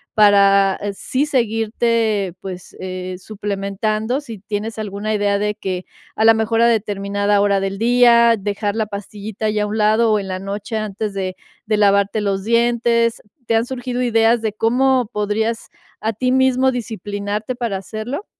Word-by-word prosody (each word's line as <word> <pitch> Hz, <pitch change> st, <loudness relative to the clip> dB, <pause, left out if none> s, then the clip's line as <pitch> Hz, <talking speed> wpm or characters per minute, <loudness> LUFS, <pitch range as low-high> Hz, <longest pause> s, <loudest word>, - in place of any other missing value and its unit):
para 200 Hz, -2 st, +5 dB
sí 260 Hz, +7 st, -1 dB
seguirte, 225 Hz, -, 0 dB
pues 185 Hz, -1 st, -9 dB
eh, 185 Hz, 0 st, -5 dB
suplementando?, 215 Hz, +4 st, -2 dB
si 230 Hz, -7 st, -9 dB
tienes 210 Hz, +3 st, -5 dB
alguna 210 Hz, 0 st, -3 dB
idea 205 Hz, -1 st, +1 dB
de 210 Hz, 0 st, -1 dB
que, 185 Hz, -3 st, -4 dB, 0.3 s
a 220 Hz, -, 0 dB
la 225 Hz, 0 st, +7 dB
mejor, 225 Hz, +1 st, +1 dB
a 235 Hz, -, +6 dB
determinada 200 Hz, -2 st, +1 dB
hora 200 Hz, -1 st, +2 dB
del 195 Hz, +1 st, -3 dB
día, 235 Hz, -1 st, +5 dB
dejar 205 Hz, +1 st, -2 dB
la 220 Hz, -1 st, 0 dB
pastillita 210 Hz, +1 st, -6 dB
ahí 215 Hz, -, -1 dB
a 210 Hz, -, +1 dB
un 210 Hz, +1 st, -3 dB
lado, 220 Hz, +2 st, +3 dB
o 215 Hz, -, +3 dB
en 195 Hz, -, -6 dB
la 185 Hz, -1 st, -3 dB
noche 205 Hz, +3 st, -4 dB
antes 215 Hz, -1 st, -3 dB
de 185 Hz, -1 st, -3 dB, 0.3 s
de 215 Hz, 0 st, +1 dB
lavarte 200 Hz, +1 st, +3 dB
los 195 Hz, -2 st, -1 dB
dientes. 235 Hz, 0 st, +2 dB, 0.3 s
¿Te 225 Hz, -, +2 dB
han 225 Hz, -, +2 dB
surgido 250 Hz, -1 st, -4 dB
ideas 230 Hz, -1 st, +3 dB
de 220 Hz, -2 st, -2 dB
cómo 250 Hz, +2 st, +2 dB
podrías 220 Hz, +2 st, -1 dB, 0.3 s
a 220 Hz, +1 st, -1 dB
ti 255 Hz, +4 st, 0 dB
mismo 260 Hz, 0 st, +3 dB
disciplinarte 215 Hz, -1 st, -4 dB
para 235 Hz, -5 st, -2 dB
hacerlo? 215 Hz, -, -6 dB
215 Hz, 165 wpm, -19 LUFS, 200-230 Hz, 0.3 s, la